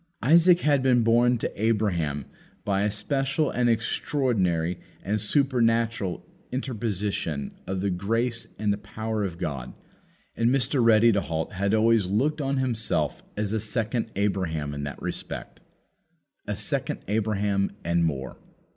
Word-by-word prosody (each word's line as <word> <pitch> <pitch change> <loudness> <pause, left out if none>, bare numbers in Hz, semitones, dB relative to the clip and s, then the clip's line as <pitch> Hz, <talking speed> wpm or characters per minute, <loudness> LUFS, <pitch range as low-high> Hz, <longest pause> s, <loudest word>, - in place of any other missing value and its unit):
Isaac 170 +4 +6
had 145 -2 +3
been 125 -2 +4
born 120 +2 +4
to 110 - -4
Abraham 85 -11 0 0.4
by 100 -1 +1
a 105 - +2
special 135 +7 0
and 120 -1 +2
extraordinary 110 - 0 0.2
and 105 +2 -1
supernatural 115 - +1 0.3
interposition 105 - -2 0.2
of 95 -1 -2
the 100 0 0
grace 115 +6 -1
and 105 -1 +1
the 100 - -5
power 110 +1 -3
of 90 -4 -4
God; 65 -6 -4 0.6
and 115 +1 +2
Mr. 130 0 +2
Ready 115 0 +6
to 100 -2 +1
halt 80 +2 -3
had 100 +3 +1
always 110 -3 +3
looked 140 - +1
on 140 0 0
himself 120 -4 0 0.2
as 105 0 -1
a 110 - +1
second 110 +1 -1
Abraham 90 -7 -1
in 70 - -4
that 70 -3 -6
respect. - - -5 0.9
A - - -2
second - - -1
Abraham, 100 -1 0 0.2
and 85 0 +2
more. 70 -5 -2
110 Hz, 140 wpm, -26 LUFS, 95-120 Hz, 0.9 s, Isaac